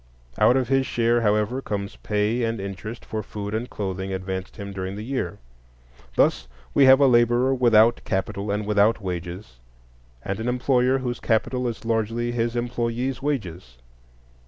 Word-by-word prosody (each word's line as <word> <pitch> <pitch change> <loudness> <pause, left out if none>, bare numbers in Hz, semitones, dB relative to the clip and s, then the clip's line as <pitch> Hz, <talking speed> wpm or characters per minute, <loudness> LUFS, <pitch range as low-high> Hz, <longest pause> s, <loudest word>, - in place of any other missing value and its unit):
Out 125 - +5
of 130 - 0
his 135 -1 +2
share, 120 0 +2
however, 105 +4 +1
comes 100 -4 -4
pay 105 +3 0
and 115 -1 -1
interest 100 +4 -7
for 110 -1 -4
food 105 -1 -6
and 115 +3 -3
clothing 95 -1 -4
advanced 95 0 -4
him 100 -2 -6
during 95 0 -4
the 105 - -6
year. 130 +3 -3 0.8
Thus 70 - +2 0.3
we 140 - +5
have 130 +1 +8
a 140 - +6
laborer 120 +1 +4
without 120 -2 +4
capital 100 +1 -2
and 105 +1 -1
without 105 +1 +3
wages, 90 - -6 0.7
and 100 +1 -3
an 115 - -3
employer 125 +1 +2
whose 125 -2 -3
capital 125 +3 0
is 115 -1 -5
largely 115 +1 0
his 120 0 -1
employees' 120 +2 -2
wages. 90 - -4
115 Hz, 160 wpm, -24 LUFS, 100-120 Hz, 0.8 s, have